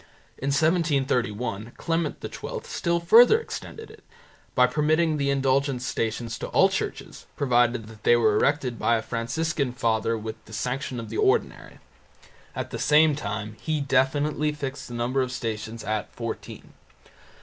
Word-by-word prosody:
In 135 - -4
1731 130 - 0
Clement 165 -2 -1
XII - - -6
still 170 0 -1
further 235 - +7
extended 450 -1 -8
it - - -17 0.5
by 125 - +6
permitting 155 +4 +1
the 140 -1 0
indulgenced 135 -1 +1
Stations 115 0 -2
to - - -4
all - - +4
churches, - - -5
provided 120 -3 +2
that 110 -1 -13
they 120 - +5
were 110 -3 +3
erected 135 -1 +1
by 115 - +3
a 110 - -4
Franciscan 125 +4 -2
father 115 -1 0
with 110 0 -7
the 110 - -13
sanction 125 +3 -3
of 115 -2 -7
the 115 - -4
ordinary. - - 0 0.8
At - - -4
the - - -5
same 150 0 +4
time 105 -3 -5
he 155 -1 -1
definitely 145 +2 +1
fixed 135 -2 -5
the 120 - -7
number 125 +3 0
of 130 -1 -2
Stations 115 -2 -4
at 110 0 -3
fourteen. 115 -1 -7
130 Hz, 150 wpm, -25 LUFS, 115-150 Hz, 0.8 s, further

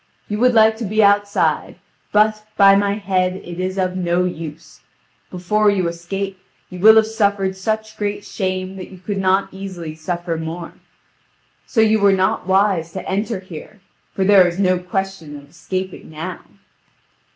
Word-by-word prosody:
You 210 0 -3
would 250 0 +3
like 220 0 +5
to 235 - -5
be 215 +1 +1
outside: 205 0 +2 0.4
but, 215 0 +2
by 195 -1 +7
my 200 0 +1
head, 185 -3 0
it 175 -2 -8
is 185 +1 -3
of 185 -1 -1
no 180 0 0
use. 165 -2 -7 0.5
Before 210 +4 +1
you 190 -4 +1
escape 190 +3 -5 0.3
you 180 - -8
will 220 +4 +8
have 220 -1 +6
suffered 200 -3 0
such 220 +2 -3
great 205 -1 -3
shame 185 -1 -3
that 185 - -8
you 190 - -12
could 195 +2 -4
not 190 +1 +2
easily 185 -5 -7
suffer 170 +1 -4
more; 165 +1 -6 0.9
so 225 - +2
you 220 0 +4
were 200 -1 +4
not 190 -1 0
wise 190 -4 +2
to 190 - -6
enter 205 +2 -2
here, 185 +3 -11 0.4
for 190 - 0
there 190 -2 +6
is 175 0 -4
no 185 -2 +2
question 180 -4 -4
of 145 0 -15
escaping 185 +2 -5
now." 155 0 -6
190 Hz, 165 wpm, -19 LUFS, 180-205 Hz, 0.9 s, will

